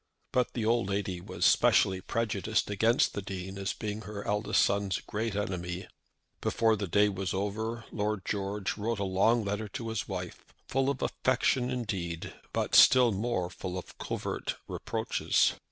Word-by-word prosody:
But 125 -1 +1
the 115 -3 -2
old 115 -3 +2
lady 100 -3 -2
was - - -2
specially 95 -1 +4
prejudiced 110 0 -1
against 115 +4 +3
the 100 - -3
Dean 95 0 -6
as 100 +1 -1
being 105 -1 -4
her 105 0 -7
eldest 105 +1 +2
son's 100 -2 0
great 110 0 -3
enemy. 90 -3 -3 0.6
Before 115 -1 +2
the 100 -2 -3
day 105 +4 +4
was 95 -2 -2
over 110 +4 -2
Lord 105 -2 -2
George 100 0 -2
wrote 110 +2 -1
a 100 - -1
long 100 +4 +2
letter 105 +2 -2
to 115 +3 -5
his 110 -2 -2
wife, 90 -3 -7
full 135 +1 +1
of 140 -2 -2
affection 125 0 +1
indeed, 95 -9 -3 0.2
but - - -1
still 125 -2 +8
more 100 -3 -1
full 90 0 -5
of 90 - -8
covert - - -3
reproaches. - - +1
105 Hz, 160 wpm, -30 LUFS, 95-115 Hz, 0.6 s, still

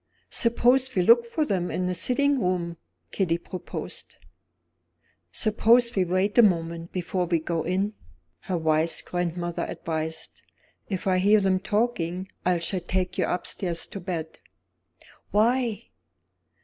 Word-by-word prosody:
"Suppose 250 +2 +3
we 180 - +3
look 235 +5 +6
for 300 +7 -1
them 180 -8 -1
in 185 - -2
the 180 - 0
sitting 255 +9 +1
room?" 175 -2 -1 0.3
Kitty 170 -4 0
proposed. 175 0 -8 1.2
"Suppose 235 - +3
we 190 -2 +2
wait 185 +3 0
a - - +11
moment, 170 -4 +1
before 180 0 -2
we 170 0 +2
go 165 +1 -2
in?" 190 +5 -1 0.5
her 185 - -3
wise 160 0 +1
grandmother 175 -1 -3
advised. 160 0 -4 0.5
"If 190 -3 -3
I 185 -1 +2
hear 205 +3 +5
them 190 -1 +2
talking 190 -4 -1 0.2
I 180 -1 +2
shall 175 +3 -1
take 180 +1 -2
you - - +2
upstairs 175 -1 -2
to 200 - -5
bed." 170 -3 -5 0.9
"Why?" 230 +1 +1
185 Hz, 135 wpm, -26 LUFS, 170-215 Hz, 1.2 s, a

